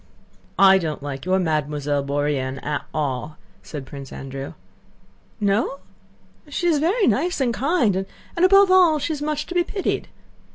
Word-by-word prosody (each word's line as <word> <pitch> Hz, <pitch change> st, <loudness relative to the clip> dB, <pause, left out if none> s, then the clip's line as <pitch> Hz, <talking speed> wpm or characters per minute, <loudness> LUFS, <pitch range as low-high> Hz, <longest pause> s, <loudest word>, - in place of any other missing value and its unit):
"I 195 Hz, 0 st, +7 dB
don't 155 Hz, -5 st, -4 dB
like 140 Hz, 0 st, -5 dB
your 185 Hz, +1 st, +2 dB
Mademoiselle 150 Hz, -4 st, -1 dB
Bourienne 140 Hz, -2 st, -1 dB
at 150 Hz, 0 st, -2 dB
all," 150 Hz, 0 st, -3 dB, 0.2 s
said 145 Hz, -4 st, -8 dB
Prince 135 Hz, -1 st, -9 dB
Andrew. 135 Hz, 0 st, -7 dB, 0.9 s
"No? 210 Hz, +6 st, +1 dB, 0.7 s
She 320 Hz, +4 st, -3 dB
is 325 Hz, -4 st, +3 dB
very 390 Hz, +9 st, +2 dB
nice 300 Hz, -, +1 dB
and 250 Hz, -3 st, +1 dB
kind 265 Hz, -, +1 dB, 0.4 s
and, 340 Hz, -, 0 dB
above 390 Hz, +1 st, +6 dB
all, 360 Hz, -4 st, +6 dB
she's 295 Hz, 0 st, -3 dB
much 300 Hz, 0 st, -2 dB
to -, -, -7 dB
be 350 Hz, -1 st, +3 dB
pitied. 390 Hz, +2 st, -2 dB
195 Hz, 150 wpm, -22 LUFS, -, 0.9 s, I